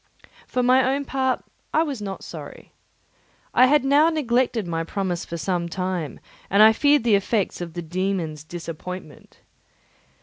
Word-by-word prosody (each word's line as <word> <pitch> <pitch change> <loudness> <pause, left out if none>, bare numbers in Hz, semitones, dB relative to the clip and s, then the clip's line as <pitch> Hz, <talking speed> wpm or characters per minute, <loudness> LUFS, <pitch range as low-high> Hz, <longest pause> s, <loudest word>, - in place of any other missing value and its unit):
For 250 - -1
my 255 +1 +5
own 280 0 -3
part 260 -1 -1 0.3
I 315 - +5
was 280 -8 -4
not 195 -2 -6
sorry. - - -10 0.8
I 255 - +6
had 290 0 +3
now 290 +4 +5
neglected 250 - 0
my 165 -1 -2
promise 180 0 -3
for 170 - -6
some 170 +2 -2
time, 180 -3 -3 0.3
and 200 +2 +6
I 220 +1 +8
feared 290 +2 +3
the 235 -3 +3
effects 200 -1 0
of 170 -2 -6
the 175 0 -5
dæmon's 170 -3 -2
disappointment. 170 -1 -8
195 Hz, 155 wpm, -23 LUFS, 175-255 Hz, 0.8 s, I